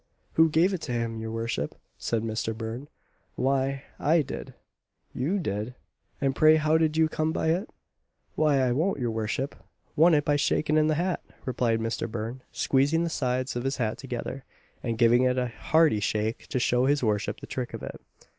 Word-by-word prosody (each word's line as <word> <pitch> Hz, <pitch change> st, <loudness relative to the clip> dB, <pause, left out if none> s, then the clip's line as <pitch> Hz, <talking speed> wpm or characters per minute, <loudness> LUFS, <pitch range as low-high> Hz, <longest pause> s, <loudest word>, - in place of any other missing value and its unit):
"Who 160 Hz, 0 st, +5 dB
gave 170 Hz, +5 st, +3 dB
it 180 Hz, -, -3 dB
to 125 Hz, -, -4 dB
him, 115 Hz, -1 st, -2 dB
your 110 Hz, 0 st, -4 dB
worship?" 115 Hz, -9 st, -3 dB, 0.2 s
said 115 Hz, -2 st, -1 dB
Mister 110 Hz, 0 st, -2 dB
Burn, 115 Hz, +5 st, -5 dB, 0.5 s
"Why, 135 Hz, +1 st, 0 dB, 0.2 s
I 160 Hz, +1 st, +3 dB
did." -, -, -7 dB, 0.6 s
"You 155 Hz, +11 st, 0 dB
did! 110 Hz, -, -3 dB, 0.4 s
and 135 Hz, -1 st, 0 dB
pray 155 Hz, 0 st, +6 dB
how 155 Hz, +1 st, +3 dB
did 155 Hz, -1 st, +1 dB
you 160 Hz, 0 st, +5 dB
come 155 Hz, 0 st, -1 dB
by 160 Hz, -, 0 dB
it?" 180 Hz, +7 st, 0 dB, 0.6 s
"Why, 150 Hz, -2 st, +3 dB
I 125 Hz, -1 st, +2 dB
won 160 Hz, +10 st, +1 dB
it, -, -, -8 dB
your 120 Hz, -2 st, 0 dB
worship 110 Hz, +5 st, -2 dB, 0.4 s
won 165 Hz, +2 st, +6 dB
it 145 Hz, 0 st, +1 dB
by 145 Hz, 0 st, +3 dB
shaking 150 Hz, +2 st, +1 dB
in 155 Hz, 0 st, +4 dB
the 155 Hz, -, +2 dB
hat;" 175 Hz, +3 st, -1 dB, 0.2 s
replied 120 Hz, -3 st, 0 dB
Mister 115 Hz, 0 st, -2 dB
Burn, 115 Hz, +3 st, -5 dB
squeezing 145 Hz, +5 st, +2 dB
the 170 Hz, -, -2 dB
sides 130 Hz, -2 st, -1 dB
of 120 Hz, -, -2 dB
his 135 Hz, +1 st, -1 dB
hat 110 Hz, -3 st, -1 dB
together, 130 Hz, 0 st, -5 dB, 0.4 s
and 115 Hz, -2 st, -2 dB
giving 120 Hz, +1 st, +5 dB
it 130 Hz, 0 st, +2 dB
a 125 Hz, -1 st, 0 dB
hearty 155 Hz, 0 st, +3 dB
shake 110 Hz, +2 st, -1 dB
to -, -, -2 dB
show 125 Hz, +1 st, +2 dB
his 145 Hz, -1 st, +2 dB
worship 105 Hz, -3 st, 0 dB
the -, -, -8 dB
trick -, -, -4 dB
of -, -, -8 dB
it. -, -, -7 dB
130 Hz, 195 wpm, -27 LUFS, 115-155 Hz, 0.6 s, pray